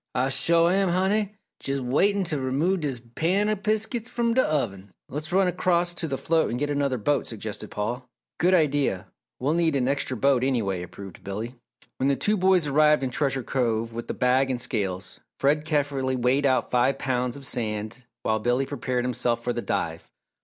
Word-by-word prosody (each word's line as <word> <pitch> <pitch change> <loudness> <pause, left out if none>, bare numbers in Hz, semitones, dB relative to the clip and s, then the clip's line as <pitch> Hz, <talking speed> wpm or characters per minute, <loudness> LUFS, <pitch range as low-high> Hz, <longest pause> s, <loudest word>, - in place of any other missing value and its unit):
"Ah 130 +2 +1
shore 165 +6 +3
am, 195 0 +2
Honey! 195 +4 +1 0.3
Jes' 140 0 -1
waitin' 190 +11 +2
t' 165 -3 -2
remove 145 +8 0
dis 140 -6 -2
pan 190 - +1
o' 215 - +2
biskits 220 +3 -1
from 235 -1 0
d' 260 - +2
oven!" 105 - 0 0.2
"Let's 150 +4 -5
run 190 +1 +3
across 175 -1 +1
to 170 -1 -4
the 135 -3 -2
float 165 +3 +1
and 120 - -2
get 145 +2 -1
another 140 -2 0
boat," 145 +6 0
suggested 110 -1 -6
Paul. 120 +4 -4 0.3
"Good 180 +4 +4
idea 145 - +1 0.3
we'll 140 +4 +1
need 165 -3 +2
an 130 -2 +1
extra 135 -2 -1
boat 135 +1 +3
anyway," 110 -9 0
approved 95 +1 -10
Billy. 105 +5 -5 0.4
When 130 - +1
the 140 - +3
two 205 - +1
boys 185 -3 +3
arrived 150 0 +4
in 130 - -1
Treasure 135 -1 0
Cove 115 -3 -1
with 115 0 -6
the - - -3
bag 130 +2 +2
and 125 -2 -1
scales, 95 -6 -3 0.2
Fred 150 +2 +2
carefully 140 -4 0
weighed 130 +3 +2
out 130 -2 +1
five 125 +2 +2
pounds 125 0 -1
of 140 - -5
sand 110 -1 -1 0.2
while 110 0 +1
Billy 120 +4 +1
prepared 130 -3 -2
himself 120 -1 0
for 120 - -1
the 120 - -2
dive. 80 -6 -3
135 Hz, 190 wpm, -25 LUFS, 120-165 Hz, 0.4 s, Good